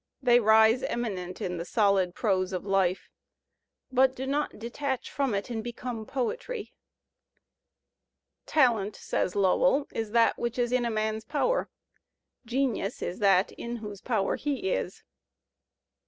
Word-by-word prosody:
They 245 -3 +5
rise 220 +2 +5
eminent 190 -7 -3
in 180 -1 -2
the 170 - -3
soUd 195 -3 +2
prose 190 -4 0
of 185 - -3
life, 195 -2 +1 0.8
but 260 0 +4
do 260 - -4
not 290 +2 -1
detach 255 +4 -4
from 270 -6 0
it 200 +5 -3
and 225 -2 -3
become 235 -2 -5
poetry. 475 - -3 1.7
"Talent," 225 -8 +2
says 180 - -2
Lowell, 200 +8 +3
"is 225 -1 -3
that 230 +1 +3
which 235 0 -2
is 240 -1 0
in 250 -1 +2
a - - 0
man's 220 0 -1
power; 315 - 0 0.8
genius 250 -5 -1
is 180 - -4
that 195 -2 +4
in 235 0 -6
whose 210 -4 -8
power 220 -6 0
he 295 +6 -2
is." - - -3
230 Hz, 140 wpm, -28 LUFS, 200-255 Hz, 1.7 s, They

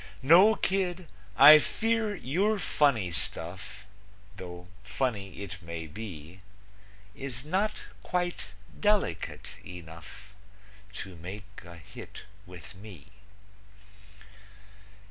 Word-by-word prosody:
No, 185 +10 +7
kid, 185 -3 0 0.3
I 150 +3 +11
fear 225 +4 0
your 195 +8 +1
funny 140 - +2
stuff, 85 +4 -4 0.5
Though 90 -2 -9 0.2
funny 100 -2 -3
it 90 -2 -8
may 85 -1 -6
be, 90 -2 -9 0.7
Is 130 0 -5
not 195 +7 -1 0.2
quite 175 - -2 0.3
delicate 205 - 0
enough 90 +3 -11 0.6
To 95 -3 -7
make 100 +4 -9
a 85 -1 -11
hit 85 - -11 0.2
with 90 +1 -11
me. 95 -5 -12
105 Hz, 90 wpm, -29 LUFS, -, 0.7 s, I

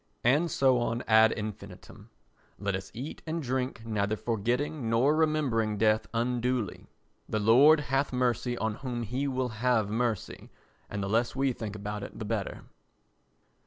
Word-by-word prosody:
And 145 +8 +3
so 130 -4 +3
on 120 0 -1
ad 110 0 +6
infinitum. 105 -2 -8 0.5
Let 100 -1 -2
us 95 0 -6
eat 130 +6 -6
and 160 +1 -2
drink 125 -2 -2
neither 105 -1 0
forgetting 120 +5 -1
nor 125 +7 +3
remembering 140 -9 +1
death 110 +1 +2
unduly. 120 -2 -1 0.4
The - - 0
Lord 130 +9 +6
hath 140 0 0
mercy 125 -1 0
on 110 -2 -2
whom 125 -3 -3
he 125 +6 -2
will 130 -2 -1
have 110 -2 +1
mercy 115 -2 -2 0.4
and 100 -1 -3
the - - -2
less 115 +5 +1
we 135 -1 +1
think 110 -3 -6
about 105 0 -5
it 100 - -8
the 110 - -5
better. 105 -2 -3
120 Hz, 155 wpm, -29 LUFS, 110-130 Hz, 0.5 s, ad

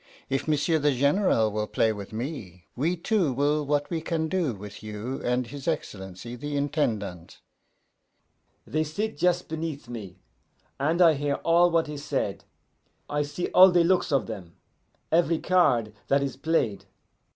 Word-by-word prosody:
If 135 +2 -1
M'sieu' 155 +2 +2
the 145 -1 +2
General 140 - +2
will 105 0 -2
play 110 +1 +1
with 100 -2 -8
me, 110 - -6
we 160 +8 0
two 175 -3 +1
will 145 +3 +1
what 145 0 0
we 165 -2 -1
can 160 -1 -1
do 170 - 0
with 100 +1 -10
you 110 +5 -5
and 125 +1 0
his 140 +3 -9
Excellency 95 +4 -4
the 145 +3 -4
Intendant.' 110 - -2 1.3
"They 155 +1 0
sit 205 +9 -3
just 180 0 +1
beneath 160 -4 -5
me, 105 -6 -8 0.6
and 160 +6 +3
I 165 -2 +7
hear 145 0 -1
all 170 +1 +5
what 165 -2 +1
is 150 -1 -6
said, - - -2 0.7
I 145 0 +1
see 150 +4 -3
all 185 +1 +8
the 175 -1 +4
looks 180 -1 +2
of 135 -6 +2
them, 95 -7 -8 0.6
every 165 0 +3
card 130 -13 +2
that 140 0 +3
is 135 -2 -3
played. 135 -8 0
145 Hz, 160 wpm, -26 LUFS, 115-165 Hz, 1.3 s, all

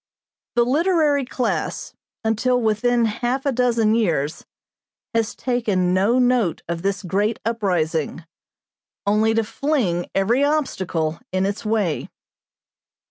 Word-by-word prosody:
The 240 0 +4
literary 300 0 +2
class, 250 0 -2 0.3
until 225 +3 +1
within 235 +1 +2
half 240 +5 -1
a 280 - +2
dozen 235 -3 +2
years, 165 -10 0 0.7
has 225 -1 0
taken 210 -8 0
no 200 +6 +3
note 245 -8 +2
of 170 0 -3
this 200 +2 -1
great 205 +5 0
uprising; 175 -8 -1 0.8
only 215 +2 +2
to 225 - +2
fling 220 - -1
every 230 +8 +2
obstacle 190 - -1
in 185 +1 +1
its 200 +2 -3
way. 210 -7 -1
220 Hz, 115 wpm, -22 LUFS, 190-250 Hz, 0.8 s, The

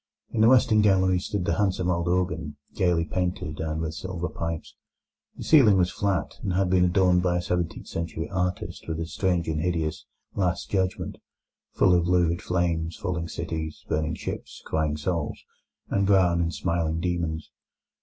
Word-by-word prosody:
In 110 - 0
the 110 - +7
western 115 -4 +5
gallery 95 -3 +3
stood 95 0 -3
the 85 -2 0
handsome 95 -3 +1
old 85 0 -1
organ, 85 -4 -1 0.2
gaily 90 -4 +2
painted, 90 -3 -2
and 80 0 -2
with 80 -1 -3
silver 90 -1 -4
pipes. 80 +1 -5 0.6
The - - -6
ceiling 120 -11 +6
was 90 -1 +2
flat, 95 -6 -1
and 95 - -2
had 95 0 +1
been 90 -1 +4
adorned 90 0 +3
by 90 -1 +1
a - - 0
seventeenth 85 -2 -2
century 85 -1 -4
artist 90 -1 -3
with 80 -1 -3
a 80 - -2
strange 90 0 0
and 80 -1 -1
hideous 80 -2 -2 0.3
"Last 90 -3 -1
Judgement", 95 -2 -1 0.5
full 90 - +4
of 85 -1 +3
lurid 90 -1 +2
flames, 85 -2 -1
falling 85 -4 -3
cities, 80 -2 -5
burning 80 +1 0
ships, - - -7
crying 75 -1 0
souls, 85 0 -2 0.5
and 100 0 +1
brown 90 -4 +4
and 85 0 0
smiling 85 -2 -1
demons. 85 -2 -2
90 Hz, 165 wpm, -26 LUFS, 80-95 Hz, 0.6 s, the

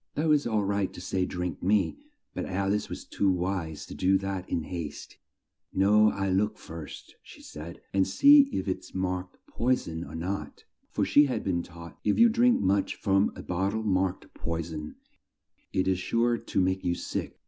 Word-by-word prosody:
It 150 - 0
was 150 -3 +3
all 110 -3 +1
right 100 -1 0
to - - -9
say 90 +1 -1
"Drink 90 -3 -4
me," 105 - +1 0.3
but - - -4
Al 95 +1 0
ice 105 - -2
was - - -7
too 100 - 0
wise 90 -4 -2
to - - -9
do 95 +1 +3
that 95 -1 -4
in 80 - -1
haste: 80 -3 -7 0.5
"No, 105 +3 +5
I'll 95 -2 -1
look 105 +3 +1
first," 80 -2 -9
she - - -15
said, 80 +3 -9
"and 95 -1 +3
see 285 - +7
if - - -2
it's 95 - -4
marked 90 -1 -3
'poi 125 +2 +1
son' 80 -8 -6
or - - -9
not," 90 +4 -4 0.3
for - - 0
she 145 - +6
had 130 - -2
been 85 -3 0
taught 85 -1 -12
if 105 - +2
you 235 0 +7
drink 240 +2 +4
much 95 +1 +1
from 95 0 +2
a - - -8
bot 95 +3 -1
tle 110 0 -2
marked 95 -2 -1
'poi 85 0 -3
son,' 75 -2 -7 0.8
it 95 - 0
is 95 -1 +2
sure 115 +5 +1
to - - -2
make 95 0 +1
you 85 -1 +1
sick. - - -4
95 Hz, 195 wpm, -28 LUFS, 90-105 Hz, 0.8 s, see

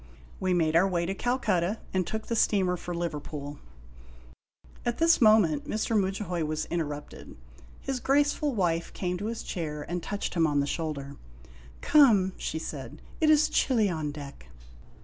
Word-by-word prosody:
We 185 - 0
made 160 -2 +1
our 180 +4 +5
way 175 -2 0
to 190 - -2
Calcutta, 210 -4 0 0.2
and 185 -2 0
took 220 0 -4
the 230 - -2
steamer 190 -4 +2
for 175 0 -6
Liverpool. 150 -3 -5 1.2
At 240 -1 -1
this 330 -2 +4
moment 210 -10 +5
Mr. 220 +1 -1
Mudjahoy 190 -3 -1
was 155 0 -2
interrupted. 150 -4 -5 0.4
His 270 -2 -3
graceful 290 +1 +1
wife 170 -4 0
came 180 -1 -3
to 205 - -3
his 230 0 -4
chair 150 -5 -4
and 175 +1 -3
touched 205 +4 -4
him 165 -2 +3
on 145 -1 +1
the 140 - +1
shoulder. 140 -2 -4 0.3
" 60 0 -21
Come," 220 -11 +5
she - - -3
said. 145 -2 -7
" - - -21
It 310 - +4
is 310 0 +5
chilly 225 -11 +2
on 155 -3 -3
deck." 140 - -10
180 Hz, 170 wpm, -28 LUFS, 155-220 Hz, 1.2 s, our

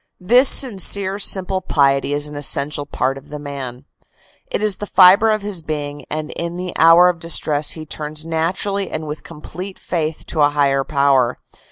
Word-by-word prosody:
This 245 +8 +4
sincere 200 -4 +2
simple 190 -1 +1
piety 140 -5 +1
is 145 0 -1
an 150 - -10
essential 145 0 0
part 135 -1 -2
of 135 - -21
the 150 - -7
man. 140 -3 -8 0.6
It - - -3
is 210 -3 0
the 210 - -6
fibre 195 +5 +6
of 215 -1 0
his 200 -4 -3
being 145 -2 -6
and 155 0 -5
in 170 +1 -5
the 180 -1 -5
hour 165 +2 +7
of 180 -2 -1
distress 155 -3 +1
he 160 -1 -8
turns 155 0 -4
naturally 180 +5 -2
and 155 0 -5
with 150 0 -7
complete 180 +4 -9
faith 160 -2 -4
to 160 - -2
a 145 - +5
higher 140 -2 +1
power. 135 -4 +1
155 Hz, 180 wpm, -18 LUFS, 145-185 Hz, 0.6 s, hour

